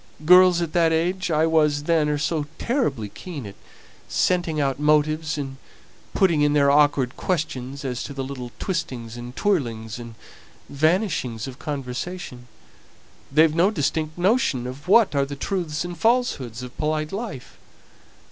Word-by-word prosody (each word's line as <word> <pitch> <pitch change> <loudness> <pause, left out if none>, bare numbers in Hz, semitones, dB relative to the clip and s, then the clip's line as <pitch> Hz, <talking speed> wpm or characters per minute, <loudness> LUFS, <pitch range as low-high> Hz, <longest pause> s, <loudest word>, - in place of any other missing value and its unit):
Girls 180 0 +7
at 160 - -5
the 165 -2 +3
age 180 +3 0
I 155 0 +3
was 150 -3 +2
then 155 -1 +2
are 150 - 0
so 150 0 -1
terribly 150 - -1
keen 140 - -8
at 100 - -8 0.6
scenting 175 -4 +1
out 135 -2 0
motives, 155 +1 +2
and 135 -2 -5 0.6
putting 170 -6 +3
in 145 0 +3
their 140 -1 +4
disagreeable 140 -3 +3
questions 140 -5 -3
as 125 -2 -3
to 140 - -7
the 135 - -3
little 130 -2 -6
twistings 125 - -4
and 120 +1 -8
twirlings 120 - -1
and 115 -1 -9 0.5
vanishings 150 - 0
of 130 -1 -9
conversation; 135 -1 -5 0.8
they've 155 +2 +5
no 175 +4 +4
distinct 155 -3 -2
notion 180 - +1
of 130 +6 -8
what 215 0 +5
are 140 -1 +2
the 140 +1 -6
truths 170 0 -2
and 175 -2 -7
falsehoods 165 - 0
of 125 0 -9
polite 155 0 -1
life. 195 - -6
150 Hz, 150 wpm, -23 LUFS, 135-170 Hz, 0.8 s, Girls